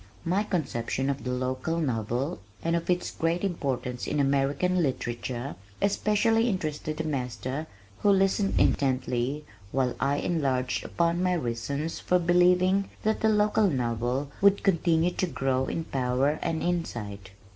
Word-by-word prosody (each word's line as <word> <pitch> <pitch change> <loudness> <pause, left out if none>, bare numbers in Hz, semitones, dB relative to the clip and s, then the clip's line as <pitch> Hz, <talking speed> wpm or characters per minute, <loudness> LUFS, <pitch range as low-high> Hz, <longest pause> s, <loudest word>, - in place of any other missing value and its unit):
My 180 +4 +2
conception 135 - -1
of 140 - -5
the 125 - -3
local 130 +5 -1
novel 125 0 -1 0.2
and 165 +1 +1
of 170 +1 -2
its 180 0 +1
great 165 +3 -1
importance 130 -9 -2
in 150 - -1
American 140 +6 +2
literature, 125 -2 -3 0.2
especially 220 +3 +2
interested 155 -5 -3
the 160 - -1
master 135 0 -3 0.3
who 205 - +3
listened 195 0 +3
intently 130 +1 +1 0.3
while 130 -2 0
I 140 +1 +1
enlarged 135 -6 0
upon 170 +1 0
my 180 0 +2
reasons 140 +2 -2
for 180 - +2
believing 180 +2 +3
that 220 +1 +1
the 220 - +4
local 210 -1 +3
novel 125 +1 -1
would 200 0 +5
continue 170 -3 +3
to 185 - -1
grow 130 -4 0
in 165 - -2
power 135 +2 0
and 165 -1 -1
insight. 110 - -3
150 Hz, 140 wpm, -27 LUFS, 130-180 Hz, 0.3 s, would